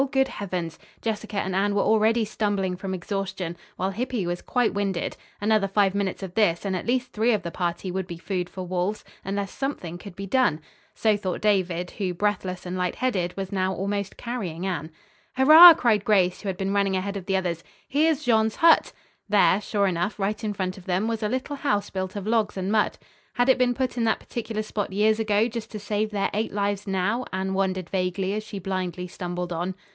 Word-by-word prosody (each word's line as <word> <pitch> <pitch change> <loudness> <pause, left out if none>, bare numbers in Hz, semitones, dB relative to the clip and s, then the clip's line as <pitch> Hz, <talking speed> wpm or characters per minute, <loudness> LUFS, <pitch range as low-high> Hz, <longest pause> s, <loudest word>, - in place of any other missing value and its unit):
Good 265 0 +2
heavens! 180 -5 -4 0.2
Jessica 220 -2 -3
and 190 -1 -1
Anne 200 +1 +1
were 200 - +3
already 220 +1 +3
stumbling 205 -3 -1
from 190 +1 -4
exhaustion, 190 -2 -4 0.2
while 190 +1 -1
Hippy 235 -1 -2
was 175 0 -3
quite 245 -2 +1
winded. 195 -3 -1 0.2
Another 210 -1 +2
five 195 -1 +2
minutes 200 -1 -2
of 185 -2 -6
this 200 -4 +2
and 190 -1 0
at 185 - -4
least 250 +1 0
three 225 +3 +2
of 205 -3 -1
the 170 - -4
party 175 +1 -2
would 190 0 -3
be 170 -2 -6
food 180 0 -3
for 185 -1 -6
wolves, 185 +3 -2 0.2
unless 195 0 -3
something 180 - -4
could 195 -1 -10
be 195 0 -5
done. 200 - +2 0.4
So 215 -2 +3
thought 190 -3 -3
David, 185 -4 +1
who, 185 -4 -3
breathless 185 -2 -1
and 180 +1 -4
light 180 -1 -1
headed, 190 -9 -1
was 195 -1 -4
now 190 -1 0
almost 200 0 -3
carrying 190 -8 -4
Anne. 165 -5 -3 0.5
"Hurrah!" 320 +6 +11
cried 220 -7 +2
Grace, 185 -4 +2
who 200 - -3
had 185 - -3
been 195 +1 -1
running 200 -1 +2
ahead 200 +2 -3
of 190 -3 -6
the 195 -1 +2
others. 170 -3 -2 0.2
"Here's 305 +1 +2
Jean's 220 -3 +2
hut!" 330 0 +5 0.4
There, 205 -1 +4
sure 205 -1 0
enough, 185 +2 -1
right 210 +2 -2
in 210 -1 -1
front 185 -1 -3
of 180 - -16
them, 190 +3 0
was 230 -1 -2
a 210 - 0
little 260 +4 -3
house 205 -8 0
built 190 0 -4
of 200 -1 -4
logs 220 -2 +1
and 190 +1 -2
mud. 215 -1 +2 0.4
Had 245 +2 +2
it 260 - +5
been 245 -1 +3
put 255 -1 -2
in 235 - +1
that 220 - +2
particular 220 -2 -4
spot 210 -2 -3
years 215 +3 +2
ago 215 0 +2
just 230 -1 -6
to 215 - -5
save 210 +1 -1
their 205 -2 -1
eight 215 +2 -1
lives 205 0 -1
now? 195 +6 0
Anne 190 0 -2
wondered 190 -2 -1
vaguely 190 +1 -1
as 215 +1 -2
she 215 -1 -7
blindly 180 -2 -3
stumbled 175 0 -4
on. 175 +3 -3
200 Hz, 210 wpm, -25 LUFS, 185-215 Hz, 0.5 s, Hurrah